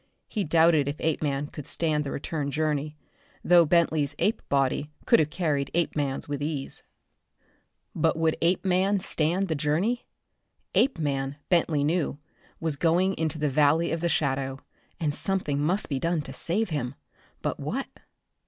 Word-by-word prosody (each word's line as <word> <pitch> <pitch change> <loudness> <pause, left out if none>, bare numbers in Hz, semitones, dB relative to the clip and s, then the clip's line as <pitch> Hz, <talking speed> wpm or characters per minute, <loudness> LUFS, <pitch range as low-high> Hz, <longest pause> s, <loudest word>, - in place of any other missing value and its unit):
He 210 - -2
doubted 160 -2 +4
if 145 +2 -3
Apeman 145 -2 -1
could 150 - -8
stand 155 -3 0
the 140 - -4
return 145 0 -3
journey, 150 0 -1 0.5
though 175 -2 +6
Bentley's 155 -3 +2
ape 215 - +1
body 140 +1 +1 0.2
could - - +5
have 155 -1 +2
carried 150 -5 -1
Apeman's 145 -5 -1
with 145 -1 -3
ease. 145 -2 -3 1.1
But - - +1
would 160 -1 +2
Apeman 185 +3 +2
stand 175 +3 +1
the 165 - 0
journey? 160 +11 0 0.7
Apeman, 140 - +1
Bentley 165 -4 +2
knew, 155 -1 0 0.4
was 160 -4 -2
going 175 +4 +2
into 160 -1 -2
the 150 -1 0
Valley 150 +4 +3
of 165 - -2
the 170 - +1
Shadow, 135 -3 -1 0.4
and 155 -4 0
something 165 -5 -1
must 180 +7 +1
be 140 -3 -2
done 165 0 0
to 135 - -7
save 185 +9 -1
him. 140 -4 -2 0.5
But - - -2
what? - - -2
155 Hz, 150 wpm, -27 LUFS, 145-170 Hz, 1.1 s, though